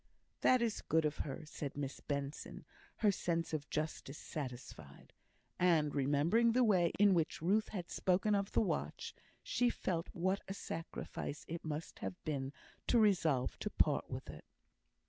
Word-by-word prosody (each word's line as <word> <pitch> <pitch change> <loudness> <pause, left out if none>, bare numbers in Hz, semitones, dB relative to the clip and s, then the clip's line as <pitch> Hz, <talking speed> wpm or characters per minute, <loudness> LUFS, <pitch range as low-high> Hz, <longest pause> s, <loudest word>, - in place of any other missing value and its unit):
"That 255 -2 +5
is 225 -2 -1
good 160 -1 +2
of 150 0 0
her," 145 +2 -4
said 145 -2 -6
Miss 140 -1 -3
Benson, 140 0 -4 0.4
her 205 - +7
sense 165 -3 -1
of 145 -2 -3
justice 155 -2 -3
satisfied; 125 - -7 0.5
and, 160 -5 +4
remembering 150 - +3
the 250 +1 +5
way 185 -7 +4
in 205 -1 +6
which 165 -3 +1
Ruth 205 +6 +2
had 180 -5 -5
spoken 190 +3 +2
of 200 0 0
the - - +4
watch, 215 - -2 0.3
she 245 -1 +2
felt 170 -7 -2
what 185 +3 0
a 195 - -4
sacrifice 165 -4 -5
it 170 +1 -5
must 155 0 -5
have 95 -1 -4
been 135 -3 -2 0.4
to 245 - +4
resolve 170 - +3
to - - -2
part - - +2
with - - -5
it. - - -12
165 Hz, 160 wpm, -36 LUFS, 145-195 Hz, 0.5 s, her